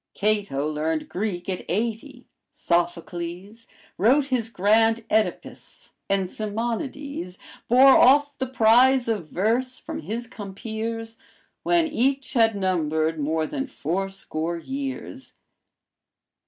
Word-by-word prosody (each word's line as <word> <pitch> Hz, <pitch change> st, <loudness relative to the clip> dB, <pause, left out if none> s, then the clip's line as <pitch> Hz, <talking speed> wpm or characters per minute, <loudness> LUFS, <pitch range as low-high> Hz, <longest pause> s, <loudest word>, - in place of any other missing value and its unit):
Cato 200 Hz, -9 st, 0 dB
learned 155 Hz, +1 st, -2 dB
Greek 180 Hz, -3 st, -3 dB
at 185 Hz, -2 st, -3 dB
eighty; 235 Hz, +6 st, -3 dB, 0.2 s
Sophocles 175 Hz, +4 st, -3 dB, 0.3 s
Wrote 260 Hz, +9 st, +4 dB
his 250 Hz, -5 st, -1 dB
grand 225 Hz, +2 st, +2 dB
Oedipus, 220 Hz, 0 st, -2 dB, 0.2 s
and 195 Hz, -1 st, +1 dB
Simonides 225 Hz, -, -4 dB, 0.3 s
Bore 260 Hz, +3 st, +7 dB
off 285 Hz, +3 st, +5 dB
the 260 Hz, -, -3 dB
prize 250 Hz, +1 st, +4 dB
of 210 Hz, -8 st, -2 dB
verse 240 Hz, +6 st, 0 dB
from 315 Hz, 0 st, -6 dB
his 235 Hz, -5 st, -4 dB
compeers, 225 Hz, +1 st, -6 dB, 0.4 s
When 345 Hz, -1 st, +2 dB
each 275 Hz, -2 st, 0 dB
had 225 Hz, -4 st, +3 dB
numbered 160 Hz, -4 st, 0 dB
more 155 Hz, +2 st, 0 dB
than 275 Hz, -, -4 dB
four 195 Hz, -, -3 dB
score 170 Hz, -3 st, -4 dB
years. 270 Hz, -, -6 dB
220 Hz, 110 wpm, -24 LUFS, 180-255 Hz, 0.4 s, Bore